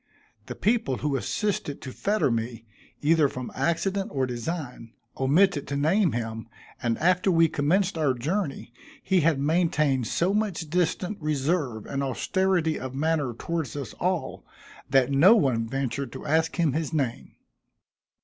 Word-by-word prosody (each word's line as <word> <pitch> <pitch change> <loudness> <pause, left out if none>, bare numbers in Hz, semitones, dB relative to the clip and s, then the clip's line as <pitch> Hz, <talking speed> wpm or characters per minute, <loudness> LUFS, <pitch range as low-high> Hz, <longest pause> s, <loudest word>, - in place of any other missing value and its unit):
The - - -6
people 215 - +1
who 145 -1 -1
assisted 150 - -2
to 130 - -6
fetter 205 - 0
me, 115 0 -3 0.4
either 155 0 +4
from 125 -1 -6
accident 180 +7 -1
or 135 -2 0
design, 125 -1 -5 0.2
omitted 145 +3 +2
to 140 - -3
name 165 +6 +2
him, 115 -1 -4 0.3
and 120 -3 0
after 180 +3 +2
we 165 -2 +5
commenced 170 +5 +1
our 140 -4 +2
journey, 145 - -3 0.3
he 190 -1 +2
had 155 -2 +2
maintained 150 -5 +1
so 180 - +1
much 200 -7 -2
distant 180 +3 -1
reserve 145 - -1
and 140 0 -3
austerity 165 +5 0
of 130 0 -6
manner 145 -4 0
towards 160 -2 -3
us 140 -2 -5
all, 180 -1 -2 0.5
that 135 0 +3
no 170 +11 +7
one 125 - +1
ventured 135 0 -3
to - - -8
ask 160 +2 +1
him 165 -6 +1
his 160 0 -2
name. 135 -7 -3
150 Hz, 150 wpm, -26 LUFS, 130-175 Hz, 0.5 s, no